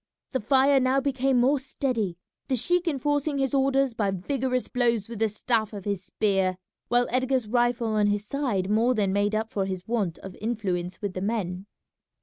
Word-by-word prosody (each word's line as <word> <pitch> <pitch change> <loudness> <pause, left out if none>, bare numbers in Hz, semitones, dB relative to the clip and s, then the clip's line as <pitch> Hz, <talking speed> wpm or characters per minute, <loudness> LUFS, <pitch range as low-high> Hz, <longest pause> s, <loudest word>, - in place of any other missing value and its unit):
The 260 - 0
fire 270 +4 +4
now 260 +1 +2
became 270 -1 +1
more 270 +4 +3
steady, 250 -9 -2 0.3
the 260 - +1
sheik 355 +8 +2
enforcing 290 0 0
his 270 -1 0
orders 270 -1 +2
by 210 -3 0
vigorous 255 +6 -1
blows 235 -4 +1
with 230 -2 -7
the 220 -1 +2
staff 220 +1 0
of 200 -2 -7
his 200 -2 -2
spear, 190 -2 0 0.3
while 245 0 +3
Edgar's 255 -1 +1
rifle 240 0 +1
on 210 -1 +2
his 205 0 0
side 230 -8 -1
more 225 +5 +2
than 200 -3 +1
made 205 +1 +1
up 220 +1 -2
for 195 -2 -1
his 185 -1 -5
want 210 -8 -1
of 190 - -8
influence 195 -5 -3
with 200 -2 -2
the 185 - -4
men. 195 -3 -2
230 Hz, 185 wpm, -26 LUFS, 200-265 Hz, 0.3 s, fire